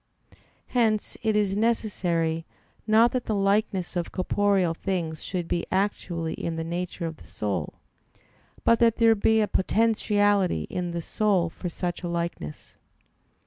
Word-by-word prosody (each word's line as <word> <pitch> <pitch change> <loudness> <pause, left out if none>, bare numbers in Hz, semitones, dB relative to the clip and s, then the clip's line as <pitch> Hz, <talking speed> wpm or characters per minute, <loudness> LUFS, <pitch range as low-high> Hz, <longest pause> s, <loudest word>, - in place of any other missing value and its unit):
Hence 220 -4 +1
it 220 -2 +1
is 205 -2 +2
necessary, 180 -7 0 0.4
not 225 +2 +5
that 255 -2 -2
the 215 - -1
likeness 195 -2 +1
of 175 -1 -2
corporeal 195 -2 +1
things 165 -3 -3
should 180 -3 -4
be 170 - -1
actually 180 -4 -1
in 165 - -4
the 165 - -3
nature 175 +1 -4
of 160 -1 -5
the - - -16
soul, 100 -7 -3 0.9
but 230 - +4
that 230 -1 +4
there 230 -1 +5
be 220 +1 +3
a 210 - +2
potentiality 205 - +2
in 180 -1 -2
the 170 -1 -4
soul 190 -5 +1
for 180 - -5
such 175 +1 -4
a 175 - -4
likeness. 170 - -5
190 Hz, 145 wpm, -26 LUFS, 170-215 Hz, 0.9 s, not